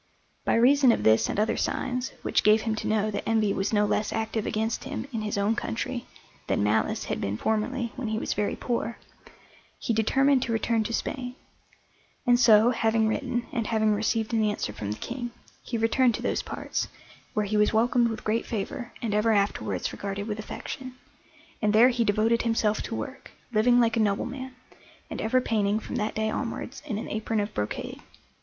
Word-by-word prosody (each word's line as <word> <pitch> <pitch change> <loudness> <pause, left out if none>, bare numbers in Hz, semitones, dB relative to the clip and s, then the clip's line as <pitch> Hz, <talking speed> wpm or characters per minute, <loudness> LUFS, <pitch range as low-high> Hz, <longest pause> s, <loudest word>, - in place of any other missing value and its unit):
By - - +3
reason 260 +2 +6
of - - 0
this 110 0 +4
and - - -1
other 215 - +2
signs, 250 0 -1
which - - +2
gave 215 +1 +5
him 220 -1 -1
to - - -3
know 215 0 +1
that 200 - -2
envy 220 -3 +2
was 195 +1 -1
no 210 -1 +3
less 210 +1 0
active 220 -1 -2
against 220 +1 -1
him - - -4
in 225 - -2
his 210 -1 -2
own 205 +3 +2
country 240 +2 -3 0.4
than - - +1
malice 105 +1 +1
had - - -3
been 100 +1 -2
formerly 225 - -1
when 250 - -4
he 220 0 -1
was - - -1
very 205 0 -1
poor, 235 -1 -2 0.8
he 230 - -1
determined 270 +5 +3
to 235 - -2
return 225 0 +1
to 230 - -3
Spain; 250 +1 -3 0.9
and 245 -1 +5
so, 230 -1 +6
having 225 -2 +2
written, 235 +2 -1
and 230 -4 -2
having 220 -1 +2
received 220 +2 0
an 220 -1 +3
answer 205 - -1
from 100 -1 -5
the 105 - -4
King, 240 0 -5 0.3
he 235 - -3
returned 225 +1 +3
to - - -6
those - - 0
parts, - - -3 0.5
where 210 - +1
he 210 +2 -2
was 210 0 +4
welcomed 235 +2 +3
with 225 -1 -4
great 220 +2 0
favour 235 +3 -4
and 220 -3 -1
ever 210 +2 +3
afterwards 200 -1 0
regarded 200 0 -4
with 215 -1 -3
affection, 255 +4 -6 0.7
and 210 -1 +2
there 230 +4 +7
he 240 -2 +1
devoted 225 +2 +2
himself 225 -2 +1
to 225 - -4
work, 275 +2 -6 0.2
living 240 +3 +5
like 230 -1 +3
a - - +1
nobleman, 250 +5 -1 0.6
and - - -4
ever 240 +4 +3
painting 215 -4 +1
from 250 - -5
that 215 -1 -2
day 220 0 0
onwards 245 +2 -4
in 215 -7 -2
an 220 - -5
apron 220 0 -1
of 205 +1 -2
brocade. 105 0 -4
220 Hz, 195 wpm, -27 LUFS, 210-240 Hz, 0.9 s, there